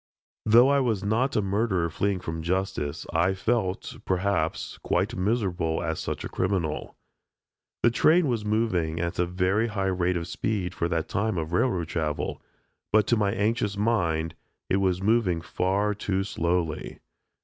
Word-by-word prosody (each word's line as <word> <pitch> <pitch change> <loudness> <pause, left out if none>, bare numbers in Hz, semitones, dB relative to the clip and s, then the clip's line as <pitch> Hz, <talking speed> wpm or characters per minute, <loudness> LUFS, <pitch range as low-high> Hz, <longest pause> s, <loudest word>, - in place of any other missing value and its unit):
Though 120 +5 +7
I 140 0 +4
was 115 -7 0
not 120 +7 +1
a 105 - +2
murderer 100 -3 +1
fleeing 100 +2 -1
from 80 -2 -4
justice, 85 -4 -2
I 85 +4 +2
felt, 95 -2 -1
perhaps, 95 +2 -1
quite - - 0
miserable 90 -6 0
as 80 -2 -2
such - - -4
a - - -3
criminal. 90 -5 -2 0.9
The 120 - +5
train 160 +7 +4
was 115 -4 -1
moving 105 -7 0
at 85 0 -2
a 90 - +2
very 95 +5 +1
high 105 -3 -2
rate 90 0 +1
of 85 0 -4
speed 95 -1 -2
for 85 - -1
that 85 0 -1
time 100 -1 -1
of 80 +1 -3
railroad 90 -5 +1
travel, 75 -3 -2 0.5
but 105 -1 +4
to 120 - +5
my 105 -3 +1
anxious 105 0 0
mind, 85 -7 +1 0.4
it 95 - +4
was 95 -1 +1
moving 105 -5 +2
far 100 +5 0
too 100 -2 -1
slowly. 85 -4 -2
95 Hz, 160 wpm, -26 LUFS, 85-110 Hz, 0.9 s, Though